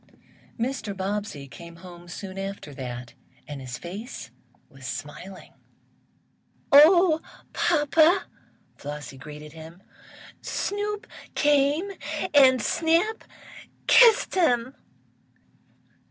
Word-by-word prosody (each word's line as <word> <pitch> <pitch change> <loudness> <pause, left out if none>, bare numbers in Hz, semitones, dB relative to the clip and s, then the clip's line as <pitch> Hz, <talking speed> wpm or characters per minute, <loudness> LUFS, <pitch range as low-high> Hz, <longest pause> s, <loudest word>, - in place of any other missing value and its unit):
Mr. 230 -5 -3
Bobbsey 195 -7 -4
came 170 +4 -12
home 175 0 -13
soon 190 +2 -7
after 195 -6 -6
that 125 -2 -7 0.3
his 130 -4 -6
face 190 - -8 0.4
was 135 -2 -11
smiling. 180 +9 -8 1.2
"Oh, 320 +3 +7 0.3
papa!" 325 +3 +3 0.5
Flossie 145 -2 -8
greeted 150 +1 -10
him, 165 +3 -12 0.6
"Snoop 415 +1 -3 0.3
came, 295 +6 +2 0.4
and 260 -5 +6
Snap 335 +7 +1 0.6
kissed 470 -2 +6
him!" 255 -9 +2
205 Hz, 80 wpm, -25 LUFS, -, 1.2 s, Oh